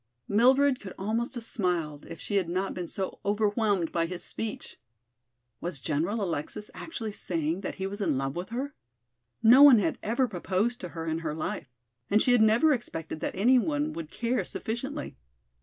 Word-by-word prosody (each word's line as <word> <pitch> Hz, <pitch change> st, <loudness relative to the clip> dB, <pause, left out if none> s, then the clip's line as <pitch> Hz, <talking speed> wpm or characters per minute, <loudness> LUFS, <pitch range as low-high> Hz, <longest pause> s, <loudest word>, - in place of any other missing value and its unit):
Mildred 260 Hz, +5 st, +4 dB
could 190 Hz, -3 st, -9 dB
almost 225 Hz, +6 st, -2 dB
have 235 Hz, -2 st, -4 dB
smiled 170 Hz, -9 st, -1 dB
if -, -, -9 dB
she 205 Hz, -, -1 dB
had 185 Hz, -4 st, 0 dB
not 185 Hz, +3 st, -1 dB
been 180 Hz, -2 st, -4 dB
so 190 Hz, +2 st, -4 dB
overwhelmed 205 Hz, -3 st, +1 dB
by 165 Hz, -1 st, 0 dB
his 180 Hz, 0 st, -6 dB
speech. 225 Hz, -1 st, -6 dB, 0.8 s
Was 175 Hz, -5 st, -3 dB
General 170 Hz, -, -1 dB
Alexis 175 Hz, +4 st, -4 dB
actually 230 Hz, -10 st, -5 dB
saying 165 Hz, -2 st, -1 dB
that 190 Hz, -, -4 dB
he 190 Hz, -, -4 dB
was 200 Hz, +2 st, -5 dB
in 165 Hz, -, +1 dB
love 135 Hz, 0 st, -2 dB
with 175 Hz, +2 st, -4 dB
her? 265 Hz, +5 st, -3 dB, 0.7 s
No 245 Hz, +5 st, +8 dB
one 285 Hz, -4 st, +10 dB
had 180 Hz, -6 st, 0 dB
ever 245 Hz, +4 st, +1 dB
proposed 195 Hz, +5 st, -1 dB
to 180 Hz, -, -5 dB
her 165 Hz, -, -3 dB
in 160 Hz, 0 st, -1 dB
her 155 Hz, -2 st, -3 dB
life 155 Hz, -2 st, -4 dB, 0.4 s
and 210 Hz, -, +4 dB
she 250 Hz, -, +3 dB
had 245 Hz, -2 st, +5 dB
never 230 Hz, +8 st, +5 dB
expected 165 Hz, -, -5 dB
that -, -, -3 dB
any 245 Hz, +7 st, +5 dB
one 295 Hz, +2 st, -1 dB
would 165 Hz, -2 st, -6 dB
care 240 Hz, +6 st, -1 dB
sufficiently. 265 Hz, +7 st, -5 dB
205 Hz, 185 wpm, -28 LUFS, 170-240 Hz, 0.8 s, one